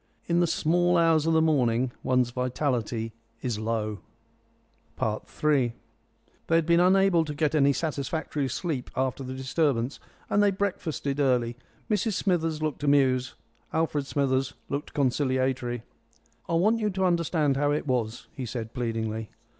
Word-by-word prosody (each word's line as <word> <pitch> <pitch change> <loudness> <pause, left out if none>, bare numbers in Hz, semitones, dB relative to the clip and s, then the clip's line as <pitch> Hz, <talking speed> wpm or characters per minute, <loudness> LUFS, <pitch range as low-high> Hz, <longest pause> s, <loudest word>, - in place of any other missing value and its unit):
In 170 0 +2
the 175 - +3
small 175 +2 +2
hours 165 -2 +3
of 165 - +3
the 160 0 +4
morning 125 -5 +2
one's 125 -1 +2
vitality 125 -3 -1 0.3
is 120 -5 -1
low. 110 -1 -2 1.0
III 120 +3 0 0.7
They 165 - +3
had 165 -1 +3
been 170 +1 +4
unable 185 -1 +4
to 150 -2 -5
get 150 0 +1
any 140 -2 +4
satisfactory 150 -1 -2
sleep 145 -3 -3
after 130 +1 -1
the 130 0 -5
disturbance, 130 -1 0 0.3
and 205 - +2
they 205 - +5
breakfasted 175 -8 -2
early. 125 -4 +2 0.3
Mrs 215 0 0
Smithers 165 -5 0
looked 155 -2 -2
amused; 130 -3 +3 0.4
Alfred 150 -3 0
Smithers 135 -1 0
looked 140 +1 -4
conciliatory. 130 -3 0 0.7
"I - - -1
want 215 +7 +3
you 210 -1 +1
to 190 -1 0
understand 165 -5 +2
how 145 +1 +1
it 150 - -1
was," 120 -4 -1
he 130 -3 -5
said 115 -1 -5
pleadingly. 115 -3 -3
140 Hz, 145 wpm, -27 LUFS, 125-165 Hz, 1.0 s, they